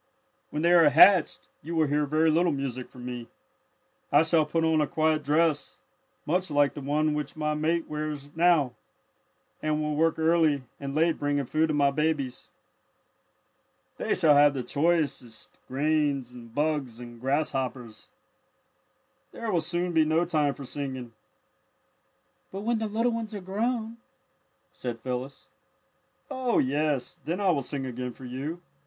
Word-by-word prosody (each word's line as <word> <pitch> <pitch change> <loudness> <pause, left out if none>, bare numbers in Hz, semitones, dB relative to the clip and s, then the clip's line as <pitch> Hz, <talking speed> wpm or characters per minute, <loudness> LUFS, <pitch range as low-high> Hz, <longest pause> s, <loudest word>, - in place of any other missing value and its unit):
"When 150 - -3
they 170 - +4
are 165 -4 +7
hatched, 175 +4 +5
you 165 +2 -6
will 160 -1 +3
hear 145 +1 0
very 155 +2 +3
little 170 +2 +3
music 135 -3 -4
from 125 -1 -11
me. 120 -2 -6 0.8
I 145 +2 +6
shall 160 -2 +2
put 165 +2 0
on 160 -1 +3
a 150 - +1
quiet 155 0 +1
dress, 155 +1 +1 0.5
much 180 +3 0
like 145 -1 +2
the 145 - -7
one 150 +2 0
which 150 0 -4
my 150 -1 -1
mate 160 +2 0
now - - -24
wears, 150 -2 -5 1.3
and 155 0 0
will 150 -1 -1
work 165 +2 +2
early 160 -3 +2 0.2
and 140 0 -5
late 165 +1 +2
bringing 145 -1 0
food 155 +5 +1
to 155 - -1
my 140 -1 +3
babies. 145 -3 -2 1.5
"They - - 0
shall 160 -5 +4
have 145 0 +6
the 130 - -2
very 120 - -16
choicest 145 -7 -1
grains 140 -2 0
and 120 -2 -12
bugs 145 -6 -1
and 120 -1 -11
grasshoppers. 130 -5 -2 1.2
There 230 -2 -4
will 175 -3 +2
soon 175 +1 -2
be 160 -1 +5
no 160 +2 +2
time 150 -4 0
for 140 - -9
singing." 130 -3 -5 1.4
"But 195 - -5
when 230 +1 0
the 220 - -2
little 230 +3 0
ones 225 -2 -4
are - - -4
grown 225 +4 -2 0.4
" - - -44
said 120 -2 -5
Phyllis. 130 +2 -5 0.8
"Oh, 260 -3 0
yes, 145 0 0
then 170 +4 -3
I 195 -2 +3
will 145 -5 0
sing 135 +1 -4
again 125 -1 -5
for 130 - -12
you. 145 +8 -5
150 Hz, 160 wpm, -27 LUFS, 135-165 Hz, 1.5 s, are